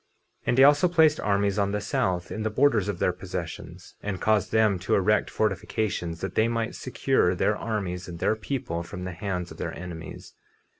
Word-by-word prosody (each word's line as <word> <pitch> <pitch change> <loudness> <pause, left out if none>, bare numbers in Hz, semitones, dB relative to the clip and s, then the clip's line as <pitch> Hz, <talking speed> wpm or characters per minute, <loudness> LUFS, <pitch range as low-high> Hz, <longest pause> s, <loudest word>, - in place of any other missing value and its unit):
50:10 - - -42
And 120 - +2
he 135 - +8
also 145 +5 +6
placed 160 -3 +4
armies 100 0 +1
on 100 0 +1
the 105 - 0
south, 95 -3 -1
in 110 - -4
the 110 - 0
borders 110 -3 +3
of 100 - -2
their - - +1
possessions, - - -7
and 100 -2 -3
caused 105 0 +1
them 110 -4 +3
to 90 - +1
erect 105 +2 +2
fortifications 95 -4 -2
that 95 -1 -3
they 110 - +3
might 115 -1 -1
secure 130 -7 +1
their 105 +4 +1
armies 95 -5 -3
and 85 -2 -7
their 110 - +1
people 110 -7 -3
from 90 +1 -7
the 90 0 -4
hands 90 -2 -4
of - - -10
their - - -4
enemies. 85 -2 -8
105 Hz, 200 wpm, -26 LUFS, 90-110 Hz, -, he